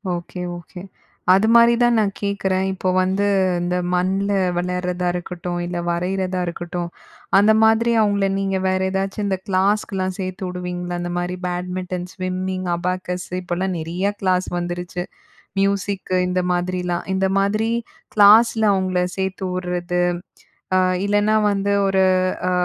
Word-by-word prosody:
Okay. 175 +1 -7 0.2
Okay. 175 +1 -11 0.5
அது 195 +3 +4
மாரி 235 0 +7
தான் 240 -1 +4
நான் 205 -2 +1
கேக்குறேன். 195 -2 0
இப்போ 185 0 -2
வந்து 190 +2 0 0.4
இந்த 175 +1 0 0.2
மண்ல 190 +3 +1 0.3
வெலார்றதா 180 0 -1
இருக்கட்டும், 175 0 -4
இல்ல 175 0 -4
வரையிறதா 185 +1 -1
இருக்கட்டும், 175 0 -4 0.5
அந்த 210 +2 +6
மாதிரி 225 +1 +4
அவங்கள 200 -2 +2
நீங்க 195 -1 0
வேற 185 0 +1
ஏதாச்சும் 195 +2 -2
இந்த 195 -2 0
கிளாஸ்க்குலாம், 190 -1 0
சேர்த்து 185 0 -4
வுடுவீங்களா? 180 0 -4
அந்த 175 0 -3
மாதிரி 175 +1 -2
பேட்மிட்டன், 180 0 -4
ஸ்விம்மிங், 185 0 -3
அபாக்கஸ்ஸு, 180 0 -3
இப்போலாம் 180 +1 -2
நிறைய 180 +5 -2
கிளாஸ் 185 -1 +1
வந்துருச்சு. 175 0 -4 0.6
மியூசிக்கு 195 -1 0
இந்த 180 0 0
மாதிரிலாம். 180 0 -1
இந்த 190 0 +1
மாதிரி 215 +3 +1 0.5
கிளாஸ்ல 220 +2 +6
அவுங்கள 185 -1 0 0.2
சேர்த்து 190 0 -2
வுட்றது, 180 -1 -2 0.8
அ - - +5 0.3
இல்லைனா 205 +1 +2
வந்து, 200 0 0
ஒரு 195 0 +2 0.5
அ - - +1
185 Hz, 130 wpm, -21 LUFS, 180-195 Hz, 0.8 s, மாரி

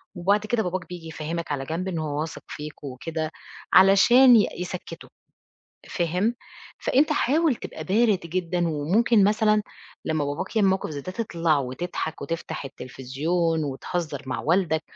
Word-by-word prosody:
وبعد 200 +4 +1
كده 220 0 +1
باباك 180 -1 -3
بييجي 175 -2 -8
يفهمك 160 +1 -5
على 135 -1 -3
جنب 165 +5 -3
إن 170 -3 -3
هو 150 -1 -2
واثق 160 0 -5
فيك 150 0 -8
وكده، 155 +4 -4 0.4
علشان 235 +7 +7
ي 205 - +4
يسكّّتُه، 180 0 -6 0.8
فاهم؟ 180 +6 0 0.4
فأنت 295 +4 +2
حاول 300 +1 +2
تبقى 155 - -8
بارد 205 +2 +3
جدًا، 175 0 -1
وممكن 195 +9 +3
مثلًا 215 +1 +3 0.4
لمّا 155 -2 0
باباك 145 +10 -4
يعمل 205 -3 +4
موقف 190 -2 0
زي 145 -2 -5
ده، 185 - -7
تطلع 170 -7 0
وتضحك 155 +5 -4
وتفتح 165 -3 -4
التلفزيون 145 +6 -2
وتهزر 150 +4 -4
مع 130 - -3
والدك، 165 -2 +1
170 Hz, 145 wpm, -25 LUFS, 155-195 Hz, 0.8 s, علشان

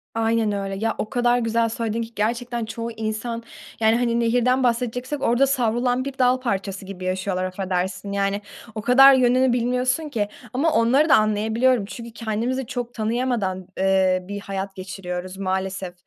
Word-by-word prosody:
Aynen 225 -1 +1
öyle. 195 -1 -3
Ya, 225 +3 -1
o 215 - -3
kadar 245 0 +2
güzel 230 0 +1
söyledin 230 0 -2
ki 230 0 -6
gerçekten 235 +2 -1
çoğu 230 +1 -5
insan, 225 +1 -4 0.4
yani, 220 0 +4
hani, 235 -1 +1
nehirden 245 +2 +2
bahsedeceksek 250 +3 -1
orada 250 +3 +3
savrulan 250 0 +1
bir 275 -1 -6
dal 255 0 +3
parçası 195 -5 -3
gibi 185 -1 -7
yaşıyorlar, 185 0 -1
affedersin. 185 +1 -3
Yani 200 0 0 0.3
o 215 - -3
kadar 270 +4 +7
yönünü 255 0 +3
bilmiyorsun 250 +5 0
ki. 220 -7 -1 0.3
Ama 300 +6 +2
onları 270 +7 +3
da - - +8
anlayabiliyorum 220 +2 +2
çünkü 235 +2 -8
kendimizi 230 +4 -2
çok 245 -2 -4
tanıyamadan, 220 -5 -1
eee, 190 -1 +3
bir 200 0 -5
hayat 195 -1 -5
geçiriyoruz 185 -1 -6
maalesef. 190 -1 -3
230 Hz, 155 wpm, -23 LUFS, 195-245 Hz, 0.4 s, da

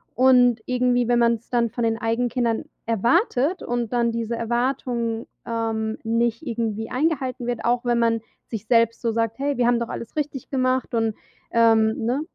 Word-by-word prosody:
Und 245 -2 +5
irgendwie, 250 -1 +1
wenn 240 0 +3
man's 235 -1 +1
dann 235 -1 +1
von 240 - -3
den 225 0 +1
eigenen 230 +2 0
Kindern 235 -2 -1 0.2
erwartet 255 - +1
und 240 -2 -2
dann 235 -1 +2
diese 230 0 -2
Erwartung, 235 -1 -1 0.2
ähm, 225 -1 -2
nicht 230 +4 0
irgendwie 225 -3 -3
eingehalten 260 -4 -1
wird, 240 -2 -3
auch 240 0 +1
wenn 240 -1 +2
man 230 -1 +2 0.3
sich 225 -1 -6
selbst 230 -1 +3
so 230 - 0
sagt: 225 +1 -1
„Hey, 280 -1 -1
wir 245 - +2
haben 240 -1 +3
doch 235 - -3
alles 230 - -7
richtig 285 -4 -3
gemacht, 255 -1 0
und“, 225 -2 0 0.4
ähm 225 -1 +4
ne? 255 +5 0
235 Hz, 175 wpm, -23 LUFS, 230-250 Hz, 0.4 s, Und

